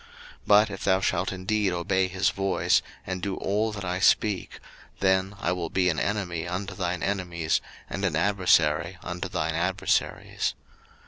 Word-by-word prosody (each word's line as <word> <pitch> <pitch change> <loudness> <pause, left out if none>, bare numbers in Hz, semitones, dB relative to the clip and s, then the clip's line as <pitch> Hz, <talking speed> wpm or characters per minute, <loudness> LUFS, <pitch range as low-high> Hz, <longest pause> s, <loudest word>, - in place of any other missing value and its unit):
02:023:022 - - -22 0.4
But 105 +1 +6
if 100 - -7
thou 95 -1 +3
shalt 95 -1 0
indeed 95 +1 0
obey 95 +2 +1
his 95 +1 +1
voice, 95 -1 +2 0.2
and 95 -1 -4
do 95 +1 -2
all 105 +3 0
that 100 -2 -6
I 90 0 -2
speak; 100 0 +2 0.4
then 95 +1 +2
I 85 - 0
will 90 -2 -2
be 90 -1 +2
an 80 - 0
enemy 90 -5 -2
unto 95 +3 -4
thine 90 -1 -2
enemies, 90 -5 0 0.3
and 100 - -5
an 90 -5 +1
adversary 85 -2 +2
unto 90 +2 -4
thine 80 -2 -1
adversaries. 90 +3 -1
95 Hz, 165 wpm, -26 LUFS, 85-100 Hz, 0.4 s, But